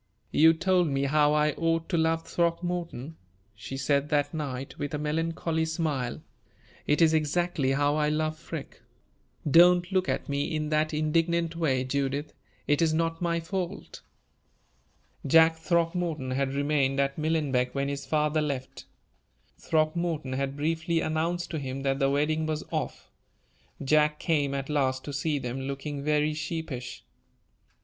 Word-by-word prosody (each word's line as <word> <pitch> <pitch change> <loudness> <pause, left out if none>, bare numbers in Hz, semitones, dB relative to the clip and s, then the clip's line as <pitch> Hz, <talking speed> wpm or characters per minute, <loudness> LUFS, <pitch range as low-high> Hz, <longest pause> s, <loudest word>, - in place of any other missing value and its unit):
"You 160 +2 +6
told 180 +1 +2
me 135 -1 0
how 150 +1 +3
I 150 0 +3
ought 165 +1 0
to 180 - 0
love 165 0 +1
Throckmorton," 170 -4 -2 0.4
she 110 +5 -7
said 140 +2 +1
that 145 0 +1
night, 135 -4 -5
with 145 +1 -3
a - - -1
melancholy 160 +2 -1
smile; 155 -7 -2 0.6
"it 150 +3 +4
is 160 -1 +4
exactly 155 -2 +1
how 145 +2 +2
I 150 -1 +2
love 155 +1 0
Freke. 165 -2 -8 0.7
Don't 175 +4 +6
look 185 -1 +1
at - - -2
me 140 +2 -1
in 155 -1 -2
that 155 0 +1
indignant 165 +2 0
way, 135 -6 +1
Judith. 140 +2 -2 0.3
It 145 +1 +2
is 160 -1 +3
not 165 +1 -1
my 170 -1 0
fault." 180 +1 -5 1.3
Jack 160 +3 +6
Throckmorton 165 -4 -1
had 135 +1 -1
remained 140 -1 +1
at 140 +1 0
Millenbeck 145 -6 0
when 140 0 0
his 140 0 -4
father 150 0 +1
left. 140 -3 -4 0.7
Throckmorton 155 -3 0
had 135 +1 -2
briefly 165 +2 0
announced 165 +2 -1
to 160 - -2
him 135 0 -5
that 135 0 0
the 135 -1 +3
wedding 155 +3 +1
was 155 -1 -2
off. - - -4 0.7
Jack 150 +2 +3
came 145 -5 0
at 135 0 -3
last 130 -3 0
to 145 - -6
see 145 +1 0
them, 130 0 -4
looking 140 +1 -5
very 150 +1 +1
sheepish. 155 -5 -5
150 Hz, 150 wpm, -28 LUFS, 140-165 Hz, 1.3 s, You